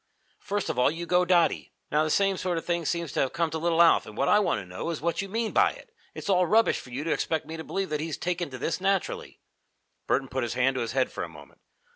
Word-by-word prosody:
First 205 +1 -3
of - - -4
all 125 - +5
you 165 +3 -4
go 180 +1 +3
dotty. 175 -2 +2 0.2
Now 150 +1 +3
the 155 - -1
same 195 +4 +2
sort 180 -2 -2
of 165 - -4
thing 170 -1 -1
seems 170 -2 -2
to - - -2
have 135 - +1
come 165 -1 0
to 160 - -3
little 170 +1 +4
Alf, 170 - +4
and 110 0 -11
what 140 - +1
I 210 - +6
want 210 - +1
to - - -8
know 90 - -5
is 165 - -3
what 170 +5 -1
you 195 - -6
mean 225 +2 -1
by - - +3
it? - - -16 0.2
It's - - -7
all 180 -2 +3
rubbish 225 +5 +3
for - - -12
you 130 +4 -4
to 165 - -1
expect 160 -1 -1
me 160 - -7
to 160 - -6
believe 195 +3 -3
that 150 - 0
he's 160 -1 -3
taken 175 -2 -2
to 130 - -7
this 165 +7 -2
naturally." 195 -1 -1 0.7
Burton 135 0 +1
put 130 +1 -3
his 120 -1 -2
hand 130 +2 +2
to 130 - -2
his 115 0 -3
head 130 -1 +1
for - - -4
a - - -6
moment. - - -15
165 Hz, 285 wpm, -27 LUFS, 140-180 Hz, 0.7 s, I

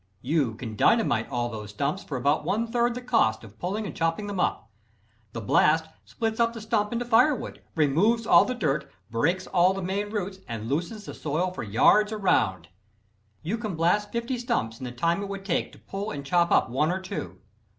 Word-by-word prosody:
You 135 -5 +1
can 110 -2 -7
dynamite 120 - +2
all 120 -1 -1
those 105 -3 -7
stumps 140 - -2
for 140 - -4
about 140 +5 +1
one 225 +3 0
third 240 +1 0
the 250 - -6
cost 230 - +2
of 110 -1 -14
pulling 205 +5 -2
and - - -6
chopping 165 +5 0
them 200 -2 -4
up. 145 - 0 0.7
The 115 - -4
blast 155 +9 +3 0.2
splits 225 0 -3
up 230 0 +3
the 230 - -7
stump 215 -1 0
into 240 +1 -2
firewood, 250 +5 +2
removes 180 +10 +2
all - - +7
the 255 - -3
dirt, 150 - -1 0.2
breaks 170 +11 +1
all 185 0 +3
the 195 - -4
main 200 +3 -2
roots, 200 -2 -4
and 115 -2 -5
loosens 175 - -3
the - - -7
soil 160 +5 -1
for 185 - -6
yards 165 - +4
around. 95 - +1 0.7
You 205 +8 -2
can 215 -6 -3
blast 175 +6 +1
fifty 235 +2 -2
stumps 230 - -2
in 130 - -6
the 125 - -5
time 170 +10 0
it 200 - -5
would 195 -1 -6
take 180 - -1
to - - -14
pull 200 +2 -5
and 140 -5 -6
chop 170 +4 +2
up - - +4
one 140 +6 +1
or 185 - -1
two. 185 - -6
180 Hz, 205 wpm, -26 LUFS, 135-215 Hz, 0.7 s, all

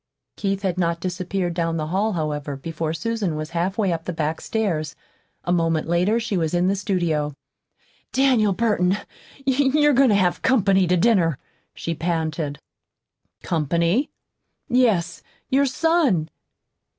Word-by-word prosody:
Keith 195 -1 -2
had 185 -2 -1
not 170 -1 0
disappeared 180 0 -2
down 165 -1 -1
the 155 - -2
hall, 205 +5 0
however, 150 -3 -3
before 160 +2 -4
Susan 195 +1 -2
was 155 +1 -5
halfway 185 +3 0
up 165 0 -5
the - - -2
back 160 -1 -2
stairs. 165 -10 -2 0.5
A 175 - -2
moment 165 -3 +1
later 180 +7 +2
she 230 -3 -2
was 165 -1 0
in 175 +1 +2
the 195 - +2
studio. 170 -8 -1 0.8
"Daniel 255 -6 +3
Burton, 195 -3 +1 0.5
you're 285 +2 +3
goin' 270 0 +5
to 210 - +4
have 185 -3 +1
company 195 -7 +3
to 180 +1 +2
dinner," 175 - +3 0.4
she 170 - -3
panted. 160 -3 -2 0.9
"Company?" 170 - +1 0.6
"Yes. 220 -9 +2 0.3
Your 275 +1 +3
son." 270 - +2
180 Hz, 140 wpm, -23 LUFS, 165-220 Hz, 0.9 s, goin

